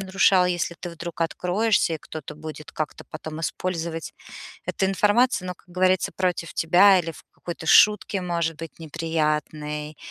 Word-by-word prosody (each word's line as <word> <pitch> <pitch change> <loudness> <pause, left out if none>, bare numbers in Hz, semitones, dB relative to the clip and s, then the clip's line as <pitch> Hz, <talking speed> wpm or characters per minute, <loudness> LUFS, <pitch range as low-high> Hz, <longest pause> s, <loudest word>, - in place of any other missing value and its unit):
нарушал, 190 -1 +4
если 175 -1 -1
ты 175 - -6
вдруг 170 0 -8
откроешься 180 +2 +1
и 155 - -5
кто-то 155 -1 -8
будет 155 0 -8
как-то 155 -1 -4
потом 155 +1 -7
использовать 165 -1 -3 0.5
эту 190 - 0
информацию, 205 +1 +2
ну, 180 - -3
как - - -28
говорится, 185 +1 +1
против 180 -3 -1
тебя 185 +4 +6
или 165 -1 -5
в - - -14
какой-то 170 -1 -7
шутке, 210 +1 +5
может 170 -3 -1
быть, 165 0 -9
неприятной, 150 -1 -2
170 Hz, 150 wpm, -24 LUFS, 160-185 Hz, 0.5 s, тебя